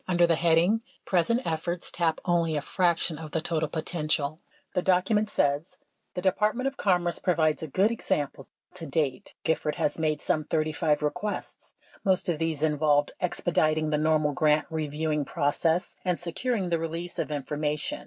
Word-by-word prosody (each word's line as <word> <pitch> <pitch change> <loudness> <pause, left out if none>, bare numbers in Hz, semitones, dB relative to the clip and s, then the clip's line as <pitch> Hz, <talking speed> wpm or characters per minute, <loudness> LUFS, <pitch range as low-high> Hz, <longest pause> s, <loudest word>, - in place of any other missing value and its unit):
Under 175 -1 +4
the 170 - +3
heading 170 +6 +3 0.2
"Present 230 +8 +1
efforts 170 +2 -2
tap 165 -2 0
only 170 -3 +2
a 145 - 0
fraction 170 -3 +1
of 160 -1 -7
the 160 - -1
total 160 -1 -1
potential," 155 -2 -1 0.3
the 180 - +1
document 190 +4 +2
says: 145 +1 0 0.4
The 180 - -3
Department 210 +6 +1
of 270 0 -1
Commerce 175 -6 +1
provides 160 -4 +1
a 160 - -4
good 195 - +2
example. 145 - -2 0.3
To 165 -3 -6
date 140 -3 -2
Gifford 155 -1 0
has 145 - 0
made 155 -2 +1
some 155 - 0
35 155 -1 0
requests. 205 +8 -4 0.3
Most 190 -2 +2
of 160 -3 0
these 160 -2 -1
involved 150 -1 +2
expediting 155 -3 +1
the 150 - +2
normal 155 -1 +2
grant 150 -1 +3
reviewing 155 -1 -1
process 165 +4 0
and 180 -2 0
securing 190 +3 -2
the 170 -1 +1
release 165 +2 -4
of - - -1
information. 150 - -2
160 Hz, 160 wpm, -27 LUFS, 150-180 Hz, 0.4 s, Under